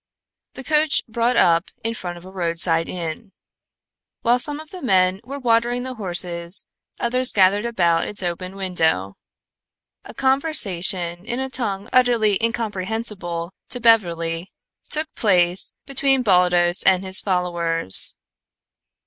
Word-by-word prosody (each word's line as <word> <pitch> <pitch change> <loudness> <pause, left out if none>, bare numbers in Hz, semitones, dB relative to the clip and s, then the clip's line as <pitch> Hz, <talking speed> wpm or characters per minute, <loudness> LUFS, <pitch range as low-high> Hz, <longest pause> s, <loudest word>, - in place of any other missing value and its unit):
The 265 - -7
coach 305 +1 +1
brought 235 +2 0
up 170 +1 +3
in 225 +1 -2
front 175 -6 -7
of 175 - -14
a 190 - -11
roadside 165 -2 +1
inn. 180 +4 -6 0.9
While 240 +1 +3
some 295 +3 -4
of 310 0 -12
the 370 - -9
men 190 -5 +2
were 275 +4 -7
watering 240 -1 +1
the 260 0 -5
horses 175 -4 -4 0.3
others 250 +2 +1
gathered 200 +2 +3
about 170 -8 +1
its 200 -2 -6
open 180 +2 -4
window. 160 - 0 0.9
A - - -12
conversation 195 - +1
in 240 +3 -4
a 265 0 -4
tongue 205 -5 -3
utterly 230 -5 +3
incomprehensible 205 -5 -2 0.2
to 245 - -3
Beverly 170 -7 +1 0.4
took 310 +1 -2
place 180 -3 +2
between 270 -1 +1
Baldos 180 -3 +3
and 190 0 +3
his 190 0 +2
followers. 170 - +2
195 Hz, 130 wpm, -21 LUFS, 175-240 Hz, 0.9 s, up